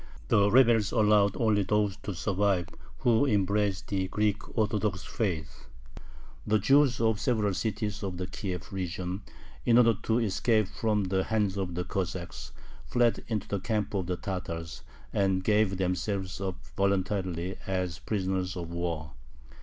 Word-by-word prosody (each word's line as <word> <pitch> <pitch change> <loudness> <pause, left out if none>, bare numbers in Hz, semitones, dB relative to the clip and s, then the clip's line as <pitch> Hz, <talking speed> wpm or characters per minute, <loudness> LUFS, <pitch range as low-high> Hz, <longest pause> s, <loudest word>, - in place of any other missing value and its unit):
The 100 0 +4
rebels 115 -3 +5
allowed 105 -3 +4
only 110 -3 +3
those 105 0 +1
to 100 -3 -6
survive 95 -1 +1 0.3
who 120 +3 +4
embraced 100 -2 +1
the 95 -2 0
Greek 105 +3 -1
Orthodox 105 -3 0
faith. 80 -9 -3 0.8
The 110 +1 +4
Jews 135 +4 +4
of 110 -2 +2
several 110 -4 +1
cities 105 +1 -2
of 95 -3 -4
the 90 - -3
Kiev 90 -1 -5
region, 90 +1 -3 0.4
in 115 - +4
order 115 -2 +6
to 115 - +1
escape 110 -1 +2
from 105 0 0
the 95 0 0
hands 105 -3 0
of 95 -3 -3
the 90 - -1
Cossacks, 90 -2 -4 0.4
fled 120 -1 +2
into 105 -3 -2
the 100 - -2
camp 105 0 -1
of 95 -3 -1
the 90 -1 -1
Tatars, 85 -4 -5 0.3
and 95 -2 +1
gave 105 -2 +2
themselves 95 +1 -2
up 95 -2 -2 0.2
voluntarily 95 -2 0
as 90 -2 -2
prisoners 95 -3 -2
of 85 -1 -5
war. 85 -3 -3
100 Hz, 145 wpm, -29 LUFS, 90-105 Hz, 0.8 s, order